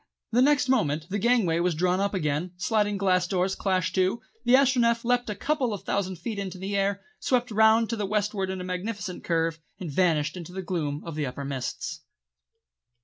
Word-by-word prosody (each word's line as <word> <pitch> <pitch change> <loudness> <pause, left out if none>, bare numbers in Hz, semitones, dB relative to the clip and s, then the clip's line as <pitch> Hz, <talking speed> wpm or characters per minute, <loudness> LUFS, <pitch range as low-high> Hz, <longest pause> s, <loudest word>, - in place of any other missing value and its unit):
The 240 +2 +4
next 285 0 +4
moment 160 - +1
the 205 - 0
gangway 205 -7 +2
was 175 -1 +1
drawn 180 +3 +1
up 200 0 0
again, 155 +1 -1
the 180 - -7
sliding 210 -2 +1
glass 185 -2 +2
doors 185 +1 0
clashed 185 -3 0
to, 190 +4 +1 0.2
the 245 +1 +5
Astronef 240 -4 +3
leapt 245 -1 +1
a 210 - -2
couple 255 -1 0
of 200 - -10
thousand 190 -2 -1
feet 200 +5 -5
into 190 -1 -5
the 195 +2 -3
air, 200 0 0 0.2
swept 250 -1 0
round 220 +1 +5
to - - 0
the 210 -3 -2
westward 205 -1 -1
in 190 0 -3
a - - -5
magnificent 185 +1 -4
curve, 165 -1 0 0.2
and 175 -6 -5
vanished 155 -1 +2
into 180 -1 -8
the 190 0 -4
gloom 155 -5 -2
of 165 - -5
the 150 -2 -2
upper 130 +2 -6
mists. 135 -2 -4
190 Hz, 205 wpm, -26 LUFS, 175-220 Hz, 0.2 s, the